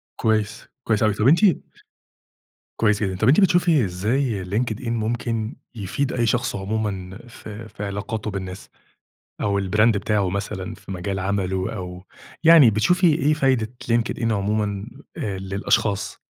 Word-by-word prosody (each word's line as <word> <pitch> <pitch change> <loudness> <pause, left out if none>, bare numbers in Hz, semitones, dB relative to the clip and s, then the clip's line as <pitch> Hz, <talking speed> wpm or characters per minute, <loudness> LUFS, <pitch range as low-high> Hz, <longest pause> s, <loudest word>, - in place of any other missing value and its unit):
كويس، 110 0 -1 0.2
كويس 110 -3 +1
أوي 105 -1 +3
طب 105 +4 +1
أنتِ 160 +5 +6 1.4
كويس 105 -1 +2
جدًا، 95 -2 -1
طب 110 - +1
أنتِ 140 +8 +6
بتشوفي 175 - +4
إزاي 105 +3 -1
LinkedIn 110 +4 -2
ممكن 115 0 -2 0.2
يفيد 115 +7 -2
أي 120 -2 +1
شخص 120 +2 0
عمومًا 95 -2 -3
في 110 -1 -10
في 105 - -8
علاقاته 105 +2 -4
بالناس، 95 -1 -6 0.7
أو 100 -1 +1
البراند 105 +3 +3
بتاعه 100 -2 0
مثلًا 100 +1 -4
في 95 - -10
مجال 95 +1 -3
عمله، 95 -1 -1
أو 90 -2 -7 0.4
يعني 160 -7 +8
بتشوفي 175 - +2
إيه 150 +1 +2
فايدة 130 -6 +1 0.2
LinkedIn 115 0 +1
عمومًا 105 0 -1 0.3
آآ 100 -3 -3
للأشخاص؟ 100 +1 -1
105 Hz, 135 wpm, -23 LUFS, 100-115 Hz, 1.4 s, يعني